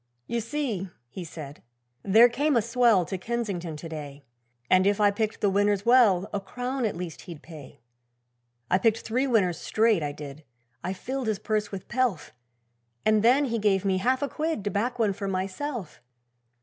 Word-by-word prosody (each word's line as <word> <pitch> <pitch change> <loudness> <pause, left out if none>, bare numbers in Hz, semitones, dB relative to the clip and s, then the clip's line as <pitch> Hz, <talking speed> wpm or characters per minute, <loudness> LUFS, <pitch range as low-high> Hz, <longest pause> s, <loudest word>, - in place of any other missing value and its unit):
'You 235 0 -2
see,' 230 -7 -3 0.2
he 185 - -6
said, 150 -3 -9 0.4
'there 220 +5 +6
came 285 +4 +1
a - - +4
swell 235 -5 +3
To 190 +1 -4
Kensington 190 -7 -3
to 165 - -8
day, 145 -3 -8 0.4
And 185 +1 +4
if 205 0 +2
I 205 -1 +5
picked 215 +1 -2
the 205 - +3
winners 205 0 +1
well, 220 -7 +5
A 205 - 0
crown 250 +5 -3
at 215 - -1
least 175 -2 -6
he'd 160 -3 -9
pay. 155 -8 -12 0.9
'I 185 - +4
picked 225 +2 +2
three 255 +5 0
winners 185 -9 +2
straight, 220 -4 +2
I 145 -1 -2
did, 145 +1 -9 0.4
I 185 - -2
filled 260 +5 -4
his 215 -2 0
purse 210 -1 -2
with 195 -2 -7
pelf, 240 - -1 0.7
And 215 -1 +4
then 255 +6 +4
he 230 -3 -1
gave 200 -2 +2
me 190 -1 +2
half 255 +7 +1
a - - +1
quid, 310 -6 -2
To 205 - -2
back 230 +5 -1
one 215 -4 +2
for 200 +1 -5
myself. 195 - -4
205 Hz, 185 wpm, -26 LUFS, 185-235 Hz, 0.9 s, there